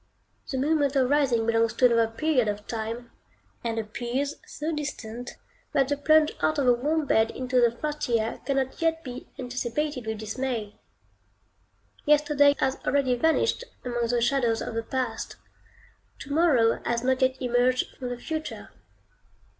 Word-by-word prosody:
The 265 Hz, -, -2 dB
moment 285 Hz, 0 st, +1 dB
of 260 Hz, -2 st, +3 dB
rising 265 Hz, -6 st, +3 dB
belongs 230 Hz, 0 st, +2 dB
to 250 Hz, -, +3 dB
another 230 Hz, -2 st, +4 dB
period 260 Hz, -1 st, +1 dB
of 205 Hz, 0 st, -3 dB
time, 230 Hz, +1 st, -5 dB, 0.5 s
and 230 Hz, -1 st, -2 dB
appears 240 Hz, +6 st, -2 dB
so 310 Hz, +2 st, -4 dB
distant, 250 Hz, -5 st, -5 dB, 0.4 s
that 270 Hz, -1 st, +2 dB
the 285 Hz, -, +2 dB
plunge 310 Hz, +2 st, +4 dB
out 310 Hz, -, +2 dB
of 280 Hz, -, +1 dB
a 245 Hz, -, +7 dB
warm 300 Hz, +6 st, 0 dB
bed 220 Hz, -4 st, +3 dB
into 255 Hz, -1 st, 0 dB
the 240 Hz, -, +5 dB
frosty 245 Hz, -1 st, -1 dB
air 220 Hz, +1 st, -3 dB
cannot 270 Hz, 0 st, -1 dB
yet 325 Hz, 0 st, +1 dB
be 250 Hz, -1 st, -8 dB
anticipated 255 Hz, +1 st, -3 dB
with 220 Hz, 0 st, -2 dB
dismay. 220 Hz, -1 st, -4 dB, 1.2 s
Yesterday 290 Hz, -1 st, +4 dB
has 265 Hz, 0 st, +1 dB
already 270 Hz, -2 st, +2 dB
vanished 320 Hz, -, +2 dB, 0.2 s
among 240 Hz, -1 st, -1 dB
the 240 Hz, 0 st, +1 dB
shadows 240 Hz, -3 st, +2 dB
of -, -, -4 dB
the 230 Hz, -, -1 dB
past; 245 Hz, -1 st, -3 dB, 0.8 s
to 280 Hz, -, -6 dB
morrow 285 Hz, -9 st, +3 dB
has 235 Hz, 0 st, -1 dB
not 260 Hz, +1 st, +1 dB
yet 260 Hz, 0 st, +2 dB
emerged 250 Hz, 0 st, +1 dB
from 250 Hz, -2 st, -5 dB
the 245 Hz, -, -4 dB
future. 315 Hz, +4 st, -5 dB
255 Hz, 155 wpm, -26 LUFS, 235-285 Hz, 1.2 s, a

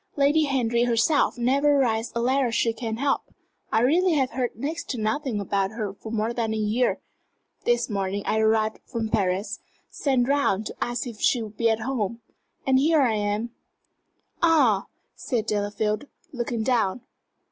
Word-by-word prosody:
Lady 290 Hz, +2 st, +3 dB
Henry 240 Hz, -4 st, +1 dB
herself 245 Hz, +5 st, +2 dB
never 280 Hz, +4 st, +3 dB
writes 230 Hz, -3 st, +1 dB
a -, -, 0 dB
letter 255 Hz, 0 st, +2 dB
she 230 Hz, 0 st, +1 dB
can 225 Hz, -1 st, -4 dB
help. 275 Hz, +2 st, +1 dB, 0.5 s
I 220 Hz, -, +3 dB
really 340 Hz, +8 st, +3 dB
have 270 Hz, -4 st, +1 dB
heard 250 Hz, -1 st, -2 dB
next 300 Hz, +9 st, -4 dB
to 255 Hz, -, -2 dB
nothing 220 Hz, +1 st, -1 dB
about 195 Hz, -1 st, 0 dB
her 215 Hz, -4 st, -4 dB
for 220 Hz, +2 st, -9 dB
more 225 Hz, +1 st, -1 dB
than 225 Hz, -2 st, -1 dB
a -, -, -2 dB
year. 215 Hz, +4 st, +1 dB, 0.7 s
This 240 Hz, 0 st, +2 dB
morning 200 Hz, -1 st, -2 dB
I 220 Hz, -, +1 dB
arrived 220 Hz, 0 st, +2 dB
from 230 Hz, -3 st, -4 dB
Paris 200 Hz, +1 st, 0 dB, 0.3 s
sent 260 Hz, -4 st, +1 dB
round 275 Hz, -7 st, +1 dB
to -, -, -6 dB
ask 240 Hz, 0 st, -3 dB
if 235 Hz, -4 st, -8 dB
she 240 Hz, -3 st, +2 dB
would 215 Hz, -1 st, -9 dB
be 230 Hz, -1 st, +3 dB
at 225 Hz, 0 st, 0 dB
home 230 Hz, -3 st, -2 dB, 0.5 s
and 265 Hz, -1 st, +4 dB
here 305 Hz, +1 st, +4 dB
I 235 Hz, -4 st, +2 dB
am." 210 Hz, +2 st, -1 dB, 0.9 s
"Ah!" 275 Hz, -, +4 dB, 0.3 s
said 235 Hz, -5 st, -2 dB
Delafield, 210 Hz, +4 st, -1 dB, 0.3 s
looking 240 Hz, -2 st, -2 dB
down. 235 Hz, -3 st, +1 dB
235 Hz, 170 wpm, -25 LUFS, 215-265 Hz, 0.9 s, and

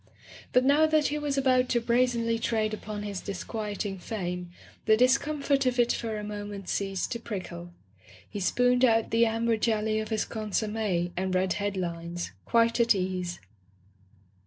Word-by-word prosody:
But 250 Hz, +1 st, +4 dB
now 295 Hz, +3 st, +5 dB
that 310 Hz, -1 st, +2 dB
he 300 Hz, +1 st, -2 dB
was 290 Hz, -2 st, -2 dB
about 255 Hz, -2 st, +3 dB
to 240 Hz, -, +2 dB
brazenly 235 Hz, -1 st, +1 dB
trade 220 Hz, -2 st, 0 dB
upon 210 Hz, -1 st, -5 dB
his 200 Hz, -3 st, -4 dB
disquieting 205 Hz, 0 st, -4 dB
fame, 180 Hz, -3 st, -4 dB, 0.4 s
the 220 Hz, 0 st, +5 dB
discomfort 275 Hz, +2 st, +2 dB
of 250 Hz, 0 st, +1 dB
it 240 Hz, -1 st, +3 dB
for 225 Hz, -2 st, -3 dB
a 210 Hz, -, -5 dB
moment 205 Hz, -2 st, -6 dB
ceased 195 Hz, -2 st, -2 dB
to 235 Hz, -, -2 dB
prickle. 175 Hz, -6 st, -6 dB, 0.6 s
He 205 Hz, -, -6 dB
spooned 245 Hz, +6 st, +2 dB
out 225 Hz, -3 st, +3 dB
the 230 Hz, +1 st, +4 dB
amber 225 Hz, 0 st, +1 dB
jelly 215 Hz, -1 st, +1 dB
of 215 Hz, -, -4 dB
his 220 Hz, -2 st, 0 dB
consomme 210 Hz, -4 st, -1 dB
and 185 Hz, 0 st, -1 dB
read 185 Hz, 0 st, +2 dB
head 205 Hz, -1 st, -2 dB
lines, 170 Hz, -1 st, -4 dB
quite 230 Hz, 0 st, +3 dB
at 235 Hz, -2 st, +5 dB
ease. 185 Hz, -2 st, -2 dB
220 Hz, 160 wpm, -28 LUFS, 195-240 Hz, 0.6 s, now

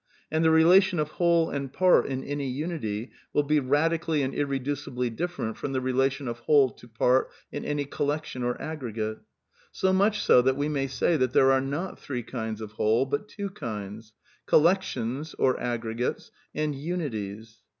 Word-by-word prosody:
And 160 Hz, +1 st, +1 dB
the 160 Hz, -, +5 dB
relation 175 Hz, +4 st, +5 dB
of 150 Hz, -1 st, 0 dB
whole 170 Hz, 0 st, +2 dB
and 140 Hz, -2 st, -3 dB
part 185 Hz, +4 st, +4 dB
in 130 Hz, -1 st, -3 dB
any 145 Hz, -1 st, -3 dB
unity 130 Hz, -6 st, -3 dB, 0.2 s
will 145 Hz, -, +3 dB
be 150 Hz, +1 st, +2 dB
radically 155 Hz, +3 st, +1 dB
and 135 Hz, 0 st, -2 dB
irredncibly 135 Hz, -3 st, -2 dB
different 175 Hz, -8 st, -3 dB
from 140 Hz, -, -4 dB
the 130 Hz, -, +1 dB
rela 130 Hz, +1 st, +2 dB
tion 135 Hz, 0 st, -7 dB
of 120 Hz, 0 st, -4 dB
whole 135 Hz, 0 st, +4 dB
to 120 Hz, -, -16 dB
part 125 Hz, +3 st, +2 dB, 0.2 s
in -, -, -5 dB
any 145 Hz, -1 st, -1 dB
collection 145 Hz, -1 st, -3 dB
or 125 Hz, 0 st, -1 dB
aggregate 115 Hz, -8 st, -4 dB, 0.5 s
So 190 Hz, 0 st, +1 dB
much 205 Hz, +2 st, +2 dB
BO 125 Hz, -, +7 dB
that 130 Hz, +1 st, +1 dB
we 145 Hz, +1 st, 0 dB
may 140 Hz, -2 st, -1 dB
say 155 Hz, +5 st, +1 dB
that 130 Hz, -2 st, 0 dB
there 135 Hz, 0 st, +5 dB
are 135 Hz, 0 st, +3 dB
not 145 Hz, +8 st, -4 dB
three 125 Hz, -4 st, -4 dB
kinds 110 Hz, -2 st, -5 dB
of 105 Hz, -1 st, -7 dB
whole 110 Hz, +4 st, +2 dB
but 145 Hz, +10 st, -3 dB
two 200 Hz, -2 st, -6 dB
kinds: 110 Hz, -, -7 dB, 0.3 s
Collections 155 Hz, -5 st, +1 dB
(or 130 Hz, -, +2 dB
aggregates) 120 Hz, 0 st, -3 dB, 0.2 s
and 155 Hz, -1 st, 0 dB
unities. 115 Hz, -, -5 dB
135 Hz, 175 wpm, -27 LUFS, 120-160 Hz, 0.5 s, BO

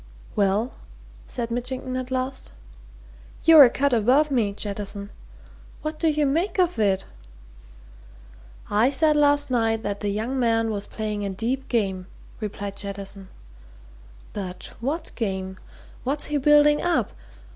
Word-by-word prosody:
"Well?" 205 Hz, +4 st, +1 dB, 0.5 s
said 235 Hz, -2 st, -4 dB
Mitchington 255 Hz, +2 st, -3 dB
at 255 Hz, 0 st, -3 dB
last. 260 Hz, -, -3 dB, 0.9 s
"You're 315 Hz, -3 st, +10 dB
a -, -, +4 dB
cut 280 Hz, +2 st, +1 dB
above 260 Hz, +7 st, +3 dB
me, 230 Hz, -6 st, +2 dB
Jettison. 200 Hz, 0 st, -4 dB, 0.7 s
What 310 Hz, 0 st, -4 dB
do 330 Hz, -, +2 dB
you 300 Hz, -1 st, +1 dB
make 335 Hz, +10 st, 0 dB
of 360 Hz, -7 st, +2 dB
it?" 195 Hz, -3 st, +2 dB, 1.7 s
"I 215 Hz, +5 st, +4 dB
said 300 Hz, +2 st, +3 dB
last 290 Hz, -2 st, +3 dB
night 225 Hz, -2 st, +1 dB
that 205 Hz, 0 st, -3 dB
the 205 Hz, -, -2 dB
young 225 Hz, +6 st, -2 dB
man 225 Hz, -2 st, +2 dB
was 205 Hz, -1 st, -4 dB
playing 210 Hz, -2 st, -3 dB
a 200 Hz, -, -2 dB
deep 245 Hz, +8 st, -2 dB
game," 190 Hz, -6 st, -1 dB, 0.3 s
replied 205 Hz, -2 st, -5 dB
Jettison. 200 Hz, -1 st, -4 dB, 1.1 s
"But 185 Hz, -3 st, -6 dB
what 285 Hz, +8 st, -3 dB
game? 190 Hz, -4 st, -3 dB, 0.4 s
What's 280 Hz, +3 st, -1 dB
he 295 Hz, -, -1 dB
building 295 Hz, +1 st, +5 dB
up? 350 Hz, 0 st, +1 dB
235 Hz, 135 wpm, -24 LUFS, 205-280 Hz, 1.7 s, You're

